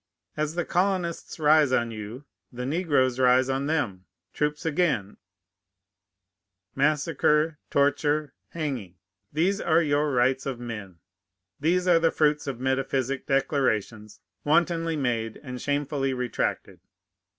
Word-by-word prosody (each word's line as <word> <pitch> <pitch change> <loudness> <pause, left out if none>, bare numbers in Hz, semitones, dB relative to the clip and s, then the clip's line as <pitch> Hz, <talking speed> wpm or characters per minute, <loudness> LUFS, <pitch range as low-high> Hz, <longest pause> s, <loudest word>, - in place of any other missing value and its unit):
As 155 +1 -2
the 175 -1 -1
colonists 180 -2 -1
rise 150 -2 +5
on 120 -2 +1
you, 110 +5 -8 0.3
the 125 0 -5
negroes 140 -5 +1
rise 130 +1 +4
on 135 +1 -1
them. 110 -13 -1 0.3
Troops 150 +1 -2
again, 150 - 0 1.6
massacre, 150 +1 +1
torture, 145 +1 +1 0.2
hanging! 130 - -4 0.4
These 185 +7 +1
are 165 0 +3
your 145 0 +1
rights 130 +1 +1
of 130 -3 -4
men! 105 -7 -7 0.6
These 180 +4 +1
are 170 -2 +5
the 165 0 +3
fruits 150 -2 +1
of 130 -3 -4
metaphysic 130 0 -1
declarations 110 -6 -1 0.2
wantonly 165 +1 +2
made 115 -6 -2
and 125 -3 -7
shamefully 145 -2 -1
retracted! 125 -2 -3
140 Hz, 115 wpm, -26 LUFS, 125-155 Hz, 1.6 s, rise